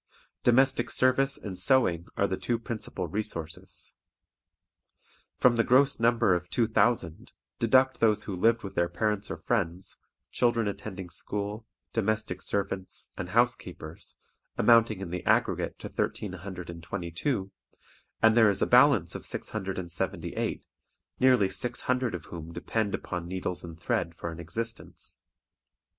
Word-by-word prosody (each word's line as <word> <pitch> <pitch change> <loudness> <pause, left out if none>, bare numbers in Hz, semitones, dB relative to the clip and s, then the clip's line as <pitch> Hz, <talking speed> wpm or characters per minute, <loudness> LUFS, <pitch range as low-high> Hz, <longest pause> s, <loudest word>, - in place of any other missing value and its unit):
Domestic 125 0 +3
service 135 +1 +2
and 95 -3 -6
sewing 95 -7 +3
are 100 - +3
the 95 - -1
two 120 +5 -1
principal 115 -1 -4
resources. 85 -6 -4 1.4
From 120 -2 +4
the 115 - +4
gross 135 +2 +4
number 115 -3 +4
of 90 0 -2
two 120 - +2
thousand 110 -2 0 0.3
deduct 130 +2 +4
those 105 -2 +3
who 100 - -4
lived 115 +5 +3
with 100 - -6
their 85 0 +1
parents 105 +3 -1
or - - -4
friends, 95 -6 -2 0.3
children 120 -3 +2
attending 95 -3 -6
school, 105 +4 -4 0.3
domestic 110 0 -1
servants, 100 -2 -3
and - - -5
housekeepers, - - -1 0.4
amounting 115 -4 +5
in 90 -3 -5
the 90 0 -4
aggregate - - +2
to - - -7
1322, 90 - -4 0.7
and 110 0 +6
there 110 -2 +7
is 100 - 0
a - - +4
balance 125 - +5
of - - -6
678, 95 -3 -3 0.5
nearly 125 -6 +5
six 115 +6 -1
hundred 125 -4 0
of 85 - -7
whom 85 -1 -8
depend 110 +3 -1
upon 90 -2 -5
needles 90 -1 -3
and 85 -1 -9
thread 85 0 -1
for 85 - -5
an 80 - -9
existence. 115 +8 -6
105 Hz, 135 wpm, -28 LUFS, 90-120 Hz, 1.4 s, there